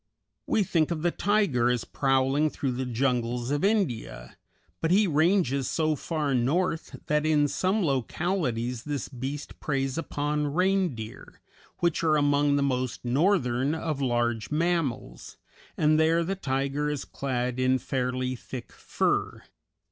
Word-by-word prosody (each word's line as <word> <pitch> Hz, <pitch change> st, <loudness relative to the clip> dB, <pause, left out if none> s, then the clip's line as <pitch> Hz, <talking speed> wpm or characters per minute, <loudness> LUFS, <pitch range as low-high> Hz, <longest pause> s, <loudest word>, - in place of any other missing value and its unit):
We 215 Hz, -, +2 dB
think 165 Hz, -4 st, +1 dB
of 165 Hz, -2 st, -3 dB
the 175 Hz, -, +2 dB
tiger 175 Hz, -, +2 dB
as 125 Hz, -2 st, 0 dB
prowling 135 Hz, +2 st, +1 dB
through 135 Hz, -2 st, -2 dB
the 130 Hz, +1 st, -3 dB
jungles 125 Hz, 0 st, -1 dB
of 145 Hz, 0 st, 0 dB
India, 145 Hz, -, -1 dB, 0.5 s
but 165 Hz, -, +1 dB
he 200 Hz, +4 st, +5 dB
ranges 155 Hz, -5 st, +2 dB
so 155 Hz, -1 st, +1 dB
far 150 Hz, -2 st, -2 dB
north 160 Hz, +7 st, 0 dB
that 150 Hz, 0 st, +1 dB
in 150 Hz, -2 st, +3 dB
some 190 Hz, +8 st, 0 dB
localities 130 Hz, -, -1 dB
this 145 Hz, -4 st, -3 dB
beast 135 Hz, +3 st, -6 dB
preys 135 Hz, 0 st, -1 dB
upon 150 Hz, -1 st, -2 dB
reindeer, 180 Hz, -, -1 dB, 0.4 s
which 170 Hz, -2 st, +1 dB
are 155 Hz, -2 st, +3 dB
among 145 Hz, 0 st, +3 dB
the 140 Hz, -, +2 dB
most 130 Hz, -2 st, -2 dB
northern 135 Hz, -1 st, +2 dB
of 155 Hz, -3 st, -3 dB
large 120 Hz, -3 st, 0 dB
mammals, 150 Hz, -, -2 dB, 0.4 s
and 155 Hz, 0 st, +3 dB
there 165 Hz, +1 st, +3 dB
the 190 Hz, +4 st, -2 dB
tiger 140 Hz, -2 st, -1 dB
is 150 Hz, -2 st, -3 dB
clad 125 Hz, -2 st, -3 dB
in 130 Hz, 0 st, +3 dB
fairly 130 Hz, 0 st, -2 dB
thick 125 Hz, 0 st, -8 dB
fur. -, -, -1 dB
145 Hz, 140 wpm, -27 LUFS, 125-160 Hz, 0.5 s, he